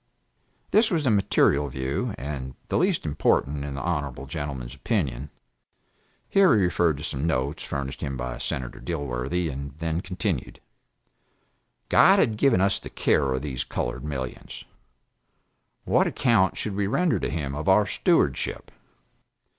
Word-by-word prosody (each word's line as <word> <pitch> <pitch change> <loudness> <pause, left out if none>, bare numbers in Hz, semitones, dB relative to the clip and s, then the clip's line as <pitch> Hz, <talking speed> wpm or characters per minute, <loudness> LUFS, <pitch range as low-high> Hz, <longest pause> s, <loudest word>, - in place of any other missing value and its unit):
This 220 +1 +5
was 165 -5 0
the 130 - +3
material 75 -8 +3
view, 65 0 -3
and 65 -2 -5
the - - +1
least 185 - +1
important 70 -1 +1
in 70 -1 -5
the 70 - -4
honorable 70 -6 -2
gentleman's 70 -5 -5
opinion. 70 - -2 1.0
[Here 195 -8 +5
he 100 - +3
referred 85 -3 +2
to 75 - -8
some 75 0 -2
notes 70 -1 -1
furnished 70 0 -5
him 70 -3 -3
by 60 -1 -4
Senator 60 -2 -4
Dilworthy, 70 +1 -2
and 70 +1 -7
then 80 +1 -2
continued.] 90 - -3 1.3
God - - +6
had 110 - +3
given 115 -3 +3
us 95 0 +2
the - - -9
care 70 -3 +1
of 65 +1 -2
these 65 -4 -3
colored - - -4
millions. 65 -4 -6 1.2
What - - +3
account 115 -7 +2
should 105 - -3
we 100 0 0
render 170 - +1
to - - -2
Him 75 -4 -3
of 75 +5 -2
our 105 +2 +5
stewardship? - - 0
75 Hz, 145 wpm, -25 LUFS, 65-95 Hz, 1.3 s, God